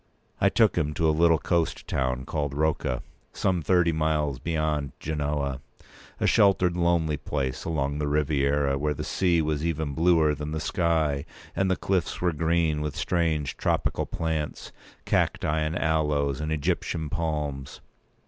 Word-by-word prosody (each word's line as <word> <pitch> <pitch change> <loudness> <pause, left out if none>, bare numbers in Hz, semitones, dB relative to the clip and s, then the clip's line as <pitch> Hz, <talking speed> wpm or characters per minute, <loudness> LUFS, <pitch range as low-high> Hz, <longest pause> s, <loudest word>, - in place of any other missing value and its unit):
I - - +4
took - - +3
him 75 0 -1
to 80 +2 +2
a - - +4
little 85 +1 +4
coast 85 +1 -1
town 65 -1 -1
called 70 -3 -2
Rocca, 75 -5 0 0.3
some 90 -3 0
thirty 90 0 +3
miles 75 -4 0
beyond 75 -3 -1
Genoa—a 70 -4 -4
sheltered 95 -3 +4
lonely 85 -3 +1
place 65 -2 -3
along 70 -3 -1
the 75 - -1
Riviera, 70 -1 +1
where 75 +1 0
the - - -4
sea 85 -4 +1
was 75 -1 -1
even 80 -3 -1
bluer 80 -1 +3
than 75 +1 -5
the 80 - -2
sky, 80 -5 0 0.3
and 95 +2 +1
the 95 - +3
cliffs 95 -1 -1
were 90 -2 +1
green 80 -1 +1
with 75 -1 -3
strange 80 -4 0
tropical - - 0
plants, 80 -2 -3 0.3
cacti, 75 +1 +1
and 75 +2 -1
aloes, 75 -4 0
and 75 +1 -2
Egyptian 80 +1 -1
palms. 75 -4 -3
75 Hz, 150 wpm, -26 LUFS, 70-85 Hz, 0.3 s, I